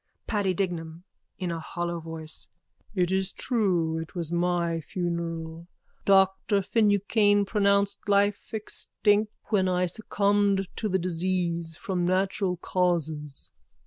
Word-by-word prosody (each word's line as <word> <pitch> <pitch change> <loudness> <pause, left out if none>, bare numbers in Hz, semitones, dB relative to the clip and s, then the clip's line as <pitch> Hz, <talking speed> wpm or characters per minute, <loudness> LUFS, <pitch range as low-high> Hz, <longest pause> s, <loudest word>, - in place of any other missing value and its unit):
_ - - -53
PADDY 200 -4 +1
DIGNAM: 170 -3 -3 0.3
(In 180 -2 -2
a 165 - -3
hollow 170 +1 -3
voice.) 160 -1 -5 0.5
It 180 -1 +2
is 190 0 0
true. 180 -9 0
It 160 +2 -8
was 170 -2 -3
my 170 -1 +1
funeral. 170 -1 -4 0.4
Doctor 195 +1 +4
Finucane 205 -1 +3
pronounced 200 0 +1
life 200 0 +2
extinct 210 -1 0 0.2
when 190 -4 +2
I 180 0 +2
succumbed 200 0 +1
to 215 - -1
the 190 - +2
disease 170 -2 -1
from 190 -5 -1
natural 190 0 +1
causes. 160 -6 -1
185 Hz, 120 wpm, -27 LUFS, 170-200 Hz, 0.5 s, Doctor